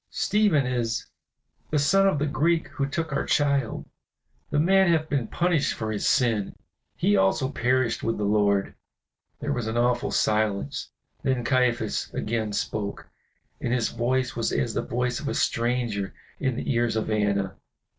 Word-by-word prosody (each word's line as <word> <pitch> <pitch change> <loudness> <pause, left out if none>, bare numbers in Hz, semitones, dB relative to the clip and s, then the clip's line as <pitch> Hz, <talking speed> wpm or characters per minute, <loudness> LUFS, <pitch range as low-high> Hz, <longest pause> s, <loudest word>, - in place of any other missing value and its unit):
"Stephen 205 -10 +2
is 120 -3 -1 0.6
the 155 - +1
son 195 +7 +4
of 190 - +2
the 145 - 0
Greek 160 +3 +1
who 140 - -2
took 160 +1 -3
our - - 0
child. 140 -5 +1 0.6
The 150 - -1
man 190 +2 +4
hath 160 -1 +1
been 135 -6 0
punished 170 -1 +1
for 110 -1 -3
his 105 - -1
sin. 115 -6 +1 0.4
He 105 - +2
also 95 +8 +2
perished 125 -1 +1
with 115 - -1
the 105 - -2
Lord." 100 -1 +2 0.7
There - - -1
was 120 -3 -2
an 110 +1 -2
awful 120 0 +1
silence. 110 +4 0 0.3
Then 130 -3 0
Caiaphas 125 0 +1
again 110 -1 -1
spoke, 100 0 -3 0.5
and - - -2
his 120 -2 +1
voice 125 +2 -1
was 115 - -1
as 115 -2 0
the - - 0
voice 125 +1 -1
of 145 - -5
a - - -1
stranger 115 -4 0 0.2
in 130 -3 0
the 130 - -2
ears 120 -1 +1
of 110 0 -1
Anna. 100 -2 0
120 Hz, 165 wpm, -26 LUFS, 110-140 Hz, 0.7 s, son